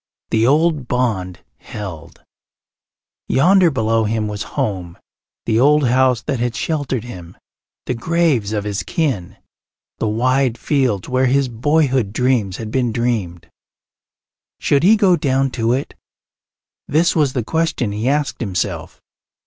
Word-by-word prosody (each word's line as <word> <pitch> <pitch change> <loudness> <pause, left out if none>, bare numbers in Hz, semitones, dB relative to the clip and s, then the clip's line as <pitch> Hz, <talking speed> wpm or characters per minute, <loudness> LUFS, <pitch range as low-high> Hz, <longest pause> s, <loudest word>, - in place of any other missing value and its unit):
The 115 +1 +3
old 150 -1 +2
bond 105 -8 -1 0.2
held. 95 -8 -9 1.0
Yonder 180 +5 +4
below 115 -5 0
him 110 0 -1
was 105 -1 -5 0.2
home 90 -5 -2 0.5
the 110 -1 +1
old 145 +1 +4
house 125 -1 +2
that 135 - -2
had 120 0 -1
sheltered 145 -7 -2
him, 90 -8 -10 0.5
the - - -1
graves 140 -5 0
of 105 -2 -2
his 100 -1 -3
kin, 130 - -2 0.6
the 110 - 0
wide 125 +3 +1
fields 130 -11 0
where 130 +1 +1
his 135 +1 +2
boyhood 130 -3 +1
dreams 120 -7 0
had 110 -2 -6
been 125 -2 0
dreamed. 110 -8 -2 1.1
Should 140 - +2
he 200 +7 +6
go 190 -4 +4
down 135 -3 0
to 115 -2 0
it? 135 +2 -3 0.9
This 160 +4 +2
was 145 -5 +2
the 125 - -1
question 160 -6 -1
he 110 +5 -1
asked 145 -1 -1
himself. 95 -6 -3
125 Hz, 135 wpm, -19 LUFS, 110-140 Hz, 1.1 s, he